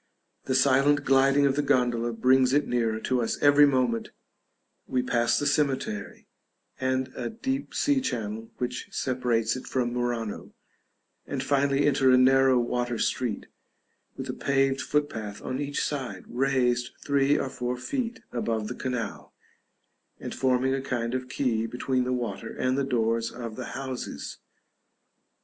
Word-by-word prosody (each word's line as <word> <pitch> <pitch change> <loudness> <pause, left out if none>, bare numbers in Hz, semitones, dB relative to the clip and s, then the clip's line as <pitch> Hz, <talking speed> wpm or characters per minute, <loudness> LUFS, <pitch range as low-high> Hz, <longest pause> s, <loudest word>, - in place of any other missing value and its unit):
The 130 - 0
silent 140 +2 +4
gliding 135 +1 +4
of 135 -1 +2
the 145 - +2
gondola 120 -4 +1
brings 130 +3 +3
it 145 0 +2
nearer 115 -2 0
to 125 +1 0
us 115 - -1
every 145 0 +6
moment; 125 -4 +1 0.8
we 125 -1 0
pass 120 -1 +2
the 145 - -1
cemetery, 135 -8 -1 0.5
and 130 0 0
a - - -3
deep 265 +5 -4
sea 285 -2 +2
channel 115 - -4
which 125 0 -3
separates 120 -3 0
it 130 - -7
from 120 -2 -1
Murano, 120 -3 -3 0.7
and - - -3
finally 140 0 +2
enter 135 -2 +3
a 130 - +6
narrow 130 0 +5
water 120 0 -1
street, 120 -4 -1 0.7
with - - -5
a - - -3
paved 135 0 +1
footpath 110 -10 -2
on 130 - -3
each 145 0 -2
side, 125 -10 -4
raised 125 -1 +1
three 140 0 +3
or 135 - -1
four 125 -1 -3
feet 240 - -3
above 115 -3 -2
the - - -3
canal, 125 -5 -5 0.8
and - - -6
forming 130 0 +1
a 135 - -1
kind 120 -3 -2
of 130 0 -3
quay 115 -4 0
between 125 +1 -1
the 125 - -1
water 120 -2 -3
and 130 0 0
the 140 - +1
doors 115 -2 0
of 115 -2 -7
the 130 - -5
houses. 130 -2 -6
130 Hz, 150 wpm, -27 LUFS, 120-135 Hz, 0.8 s, every